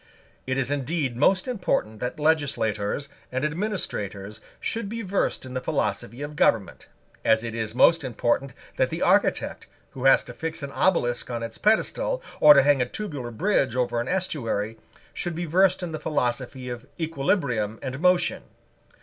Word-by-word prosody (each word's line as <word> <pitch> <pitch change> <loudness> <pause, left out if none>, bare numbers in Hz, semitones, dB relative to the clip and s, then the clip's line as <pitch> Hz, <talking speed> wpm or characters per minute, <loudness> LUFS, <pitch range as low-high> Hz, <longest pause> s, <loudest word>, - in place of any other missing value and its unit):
It 130 0 0
is 135 0 0
indeed 145 -2 -1
most 185 - +3
important 180 - -1
that 125 +6 -4
legislators 140 -6 0 0.2
and 130 +3 -1
administrators 110 - -3 0.2
should 225 -3 -3
be 230 +1 -4
versed 195 -7 -1
in 130 - -8
the 130 - -2
philosophy 125 +1 -2
of 150 +1 -6
government, 110 -8 +1 0.4
as 110 0 +3
it 115 -1 -4
is 110 0 -3
most 165 +5 +5
important 130 +1 -1 0.2
that - - +2
the - - -2
architect, - - +2 0.2
who 130 0 -6
has 135 - +6
to 120 - -10
fix 160 +3 -5
an 140 - -5
obelisk 130 -8 +1
on 120 -1 -3
its 115 -1 -6
pedestal, - - +1 0.2
or 150 -1 +9
to 140 - +6
hang 145 -2 +4
a 125 - +1
tubular 150 - -5
bridge 135 - +1
over 120 -2 0
an 120 - -5
estuary, 115 - -2 0.3
should 175 -2 -3
be 175 +1 -3
versed 185 +3 +3
in 175 - -4
the 155 - -4
philosophy 130 -2 -2
of 120 +1 -6
equilibrium 135 - 0
and 130 0 -4
motion. 180 +1 +2
135 Hz, 165 wpm, -25 LUFS, 120-170 Hz, 0.4 s, or